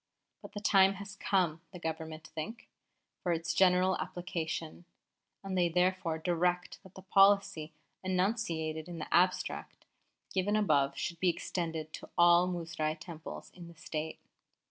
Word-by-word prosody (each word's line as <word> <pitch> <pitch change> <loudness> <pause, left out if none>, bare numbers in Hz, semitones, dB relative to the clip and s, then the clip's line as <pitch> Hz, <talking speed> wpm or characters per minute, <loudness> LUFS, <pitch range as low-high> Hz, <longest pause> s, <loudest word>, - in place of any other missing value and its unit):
But - - -11
the 205 - -4
time 195 -2 +5
has 200 0 -8
come, 180 -6 +1
the 185 - -8
Government 160 -1 -5
think, 210 +9 -6 0.5
for 175 - 0
its 165 0 -1
general 185 0 +4
application, 170 -1 -4 0.6
and 195 -1 -3
they 175 -2 +3
therefore 180 -1 +1
direct 175 +1 0
that 190 -2 -17
the 190 - -10
policy 195 -4 +4 0.3
enunciated 180 -5 -1
in 175 - -6
the 155 - -5
abstract 185 +1 +1 0.5
given 195 +2 +1
above 150 -10 +2
should 170 -1 -3
be 185 - +3
extended 165 -2 -3
to - - -8
all 175 +1 +6
Muzrai 165 -3 -2
Temples 160 0 -8
in 175 -2 -11
the 170 - -13
State. 160 0 -5
175 Hz, 145 wpm, -32 LUFS, 160-190 Hz, 0.6 s, all